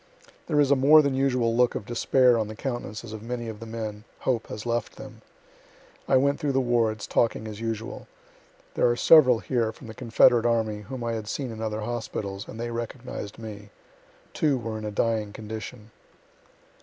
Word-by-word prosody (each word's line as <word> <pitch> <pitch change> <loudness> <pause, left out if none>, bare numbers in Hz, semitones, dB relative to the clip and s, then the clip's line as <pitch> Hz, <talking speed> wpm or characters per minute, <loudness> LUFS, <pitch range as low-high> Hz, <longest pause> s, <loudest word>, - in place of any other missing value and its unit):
There 150 - +1
is 145 -1 +4
a - - +7
more 150 +3 +7
than 140 -1 +1
usual 125 -4 +1
look 125 0 +3
of - - -4
despair 120 +1 +3
on 110 - -1
the 110 - -8
countenances 115 -3 -5
of 110 - -7
many 120 +1 -4
of 110 -2 -7
the 115 - -8
men; 110 -2 -5 0.2
hope 120 -4 0
has 105 - -7
left 120 0 -2
them. - - -11 0.9
I 135 - +5
went 140 +2 +2
through 145 -2 -1
the 135 - +3
wards, 115 -4 +1
talking 110 -1 0
as 105 0 -8
usual. 115 0 -4 0.7
There - - +3
are 120 - +2
several 130 -3 +7
here 115 -4 0
from 120 - -14
the 110 - -8
confederate 120 0 +4
army 110 -3 0
whom 120 +4 -7
I 115 0 -1
had 110 -2 -4
seen 130 +2 -3
in 110 0 -7
other 110 -1 -2
hospitals, 105 -3 -4
and 110 - -9
they 120 0 -3
recognized 115 -2 -6
me. 105 -2 -9 0.6
Two 145 -4 +2
were 115 -2 -4
in 110 - -6
a 105 - -3
dying 105 -1 0
condition. 110 +1 -8
115 Hz, 195 wpm, -26 LUFS, 110-125 Hz, 0.9 s, a